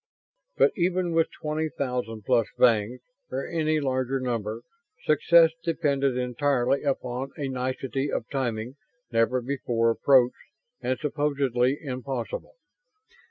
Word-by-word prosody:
But, - - +5
even 180 0 0
with 165 0 +2
twenty 155 +1 -3
thousand 125 -6 -3
plus 120 -4 +3
Vangs 115 +1 +3 0.3
or 135 +1 -3
any 155 -2 +1
larger 130 -1 -1
number 115 -3 -3 0.4
success 170 -1 +5
depended 140 -6 +1
entirely 125 +1 +1
upon 130 -2 -2
a 140 - -2
nicety 130 +1 -2
of 110 - -2
timing 125 -1 -2 0.3
never 115 +2 +2
before 120 -3 0
approached 125 +1 +3 0.3
and 130 +1 -1
supposedly 140 -3 0
impossible. 135 - -5
130 Hz, 115 wpm, -26 LUFS, 125-145 Hz, 0.4 s, But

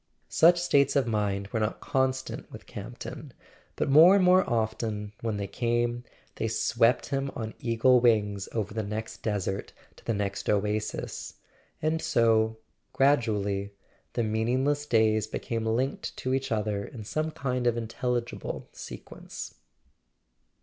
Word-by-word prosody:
Such 175 +2 +5
states 140 -6 +3
of 140 -3 +3
mind 100 -3 -1
were 110 - -1
not 110 0 -1
constant 130 0 -1
with - - -10
Camp - - -8
ton; - - -8 0.4
but - - -1
more 160 +7 +8
and 200 - +4
more 185 +1 +6
often, 110 -2 -2
when 110 -2 -2
they 100 - -2
came, 120 +3 -1 0.3
they - - -1
swept 115 +3 +2
him 135 0 -1
on 110 -2 -4
eagle 120 +2 +4
wings 105 -5 +2
over 105 -3 -2
the 110 - -1
next 110 +2 -5
desert 100 -2 -2 0.2
to - - -17
the 115 - -1
next 100 0 -3
oasis; 105 +1 -2 0.5
and 160 +1 +1
so, 110 -1 +3 0.4
gradually, 105 -7 +1 0.4
the 120 - 0
meaningless 130 +7 0
days 110 -3 +3
became 115 0 -3
linked 125 +5 -1
to 130 - -2
each 135 -1 -1
other 105 -2 0
in 110 +1 -8
some 155 +9 -2
kind 125 -5 -2
of 120 -1 +2
intelligible 120 +1 -3
sequence. - - -9
115 Hz, 145 wpm, -28 LUFS, 105-130 Hz, 0.5 s, more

